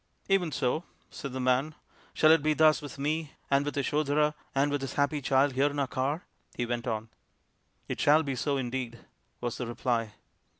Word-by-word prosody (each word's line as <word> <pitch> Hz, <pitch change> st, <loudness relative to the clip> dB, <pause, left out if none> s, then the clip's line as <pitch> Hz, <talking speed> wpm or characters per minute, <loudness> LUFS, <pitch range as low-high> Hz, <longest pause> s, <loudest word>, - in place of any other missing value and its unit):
" -, -, -36 dB
Even 175 Hz, -4 st, 0 dB
so," 140 Hz, +5 st, 0 dB, 0.3 s
said 140 Hz, -, -6 dB
the 130 Hz, -, -4 dB
man, 130 Hz, +4 st, +1 dB, 0.2 s
" -, -, -29 dB
Shall 155 Hz, -, +6 dB
it 160 Hz, -1 st, +6 dB
be 155 Hz, +1 st, +2 dB
thus 155 Hz, 0 st, +5 dB
with 145 Hz, -1 st, -8 dB
me, 150 Hz, +2 st, -2 dB, 0.2 s
and 140 Hz, 0 st, +4 dB
with 145 Hz, -, -3 dB
Yasodhara, 150 Hz, +1 st, +1 dB, 0.2 s
and 140 Hz, +1 st, +2 dB
with 145 Hz, -1 st, -1 dB
this 135 Hz, -, -4 dB
happy 145 Hz, +1 st, +1 dB
child 135 Hz, +1 st, +3 dB
here 135 Hz, +3 st, +3 dB
in 145 Hz, -, -3 dB
my 140 Hz, -1 st, +1 dB
car? 135 Hz, +6 st, -2 dB, 0.2 s
" -, -, -31 dB
he 120 Hz, -, 0 dB
went 120 Hz, 0 st, -3 dB
on. 110 Hz, -1 st, -2 dB, 0.4 s
" -, -, -43 dB
It -, -, -4 dB
shall 150 Hz, +2 st, +5 dB
be 140 Hz, -2 st, -2 dB
so 140 Hz, +3 st, 0 dB
indeed," 125 Hz, -2 st, -3 dB, 0.4 s
was 120 Hz, -1 st, -3 dB
the 125 Hz, -, -3 dB
reply. 115 Hz, -2 st, -1 dB
140 Hz, 215 wpm, -29 LUFS, 125-150 Hz, 0.4 s, Shall